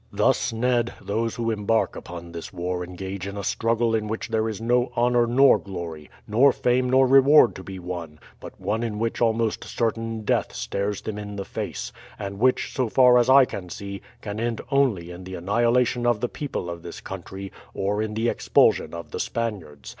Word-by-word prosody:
"Thus, - - +2
Ned, 120 0 +1
those 115 +3 -2
who 115 -1 -1
embark 110 +1 0
upon 85 0 -8
this 85 -1 -7
war 90 +1 -3
engage 95 +2 -6
in 100 +1 -6
a 100 - -4
struggle 115 +2 +1
in 110 -1 0
which 110 +2 -4
there 110 0 0
is 105 -3 -5
no 120 +2 +1
honour 120 0 +3
nor 135 +3 +5
glory, 85 -6 -7 0.2
nor 125 +6 +5
fame 125 +1 +1
nor 130 +1 +5
reward 135 0 +6
to 95 - -9
be 95 0 -8
won, 85 -4 -6 0.2
but - - -11
one 105 +4 -1
in 115 -3 -3
which 115 +2 -2
almost 115 -1 +1
certain 115 -1 -2
death - - 0
stares 100 +1 -3
them 105 -1 -4
in 105 0 -7
the 100 -1 -4
face, - - -5 0.2
and 100 -1 -6
which, 130 +2 +2
so 130 -4 0
far 125 0 +6
as 120 - +2
I 135 0 +8
can 90 -7 -7
see, 100 +2 -7 0.2
can 105 0 -5
end 115 0 -1
only 115 -12 +1
in 90 +1 -9
the 95 0 -7
annihilation 120 +6 +1
of 120 -3 +2
the 125 - 0
people 145 -11 -4
of 85 -1 -6
this 85 - -8
country, 95 +1 -8 0.2
or 100 +2 0
in 110 -1 -3
the 115 +2 0
expulsion 85 - +2
of 85 - -8
the - - -4
Spaniards. 95 - -4
110 Hz, 200 wpm, -24 LUFS, 95-120 Hz, 0.2 s, I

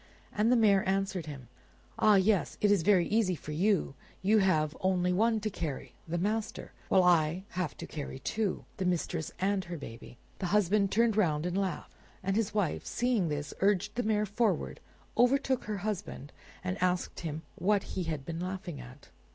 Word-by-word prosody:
And 220 +3 +2
the - - +6
mare 205 -4 +4
answered 195 -3 -1
him, 135 -5 -8 0.5
"Ah 215 -1 +6
yes, 195 0 +2
it 205 - +3
is 200 -4 +4
all - - -8
very 190 -4 +4
easy 205 -4 +2
for 155 - -8
you: 180 -1 +1 0.3
you 215 +3 +4
have 155 -5 +2
only 180 -1 +2
one 220 +4 +2
to 215 - -1
carry, 155 -7 -5
the 170 +2 -2
master; 215 +4 -2 0.2
while 190 -1 +5
I 170 0 +3
have 180 -3 -3
to - - -6
carry 145 -3 -6
two, 210 +7 -2
the 190 - -2
mistress 170 -2 -1
and 195 0 0
her 175 0 -5
baby." 115 -3 -10 0.2
The 185 - -1
husband 200 0 +2
turned 230 -1 +3
round 160 -6 +2
and 180 0 -2
laughed, 190 -5 -2 0.3
and 195 +1 0
his 215 -1 +1
wife 205 -7 -1
seeing 235 -8 0
this, 145 -1 -3
urged 200 +1 +2
the 245 - -1
mare 215 -2 +1
forward, 215 +3 0 0.4
overtook 260 +1 +2
her 210 -1 -3
husband, 200 -8 -4 0.3
and 185 +1 -3
asked 180 -1 0
him 160 -1 -5
what 200 +1 +1
he 185 -2 -2
had 155 -4 -4
been 165 -1 -4
laughing 180 -4 -5
at. 125 +3 -13
190 Hz, 185 wpm, -30 LUFS, 165-210 Hz, 0.5 s, the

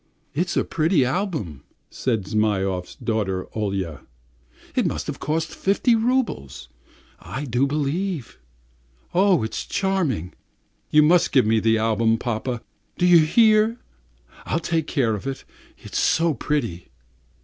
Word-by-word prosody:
"It's 175 +3 -1
a - - +3
pretty 160 -3 +2
album," 140 - -2 0.3
said 115 -6 -1
Zhmyhov's 95 -3 -1
daughter 95 -5 -2
Olya, 95 -7 -3 0.7
"it - - +2
must - - -3
have - - -5
cost 160 +2 -2
fifty 205 +5 +2
roubles, 220 - -1 0.5
I 140 +2 -6
do 125 +2 +1
believe. 150 - -2 0.7
Oh, 185 - +4
it's 110 - -3
charming! 170 - -1 0.6
You 150 0 +5
must 170 +3 +4
give 130 -4 +4
me 110 +1 +3
the 110 0 +2
album, 115 0 +2
papa, 120 +1 -3 0.3
do 180 - +2
you 175 -1 +7
hear? 215 +7 +4 0.7
I'll 160 - 0
take 165 -2 -1
care 120 -6 +1
of 105 +5 -5
it, 135 -1 -4 0.3
it's - - -5
so 165 -2 +2
pretty." 120 - -3
135 Hz, 130 wpm, -23 LUFS, 110-175 Hz, 0.7 s, you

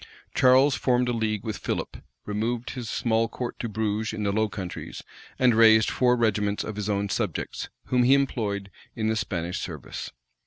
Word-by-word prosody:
Charles 130 +2 +5
formed 125 -1 +1
a - - +1
league 110 -3 -1
with 110 - -4
Philip, - - -3 0.3
removed 115 +4 -2
his 120 -4 -6
small 115 -1 +1
court 120 +1 -5
to 115 - -3
Bruges 110 0 -1
in 110 -1 -3
the 100 - +1
Low 110 +1 +1
Countries, 95 -3 -6 0.3
and 125 -2 +4
raised 110 -1 +6
four 125 -1 +3
regiments 105 -3 +1
of 110 - -5
his 105 0 -3
own 100 0 0
subjects, 100 -4 -3 0.2
whom 125 -1 +2
he 130 +3 +6
employed 105 -8 -1 0.2
in 110 -1 0
the 110 - +1
Spanish 90 -4 -2
service. - - -6
110 Hz, 180 wpm, -26 LUFS, 105-120 Hz, 0.3 s, raised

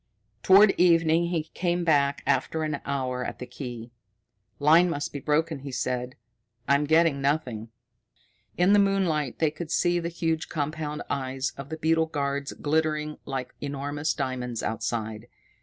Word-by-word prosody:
Toward 195 +2 +7
evening 165 -1 +4
he 170 -3 -1
came 175 -1 0
back 145 -4 +2
after 160 -1 0
an 150 -2 -2
hour 130 -2 -2
at - - -5
the 125 - -7
key. 120 -2 -8 0.7
"Line 160 +5 +5
must 145 -3 -3
be 140 - -4
broken," 155 +2 0
he 140 0 -7
said. 125 0 -2 0.5
"I'm 140 +1 +3
getting 160 -2 +3
nothing." 130 -6 -1 0.9
In 180 +3 +4
the 205 - +6
moonlight 185 -9 +1
they 155 -2 +2
could 155 +1 -7
see 175 +1 +2
the 170 0 -3
huge 165 -2 -2
compound 150 0 -3
eyes 135 -1 -2
of 140 0 -9
the 160 - -5
beetle 160 +1 +2
guards 140 -2 -2
glittering 155 0 -1
like 135 -2 -4
enormous 145 +2 -2
diamonds 125 -4 -3
outside. 110 0 -3
150 Hz, 150 wpm, -26 LUFS, 135-160 Hz, 0.9 s, Toward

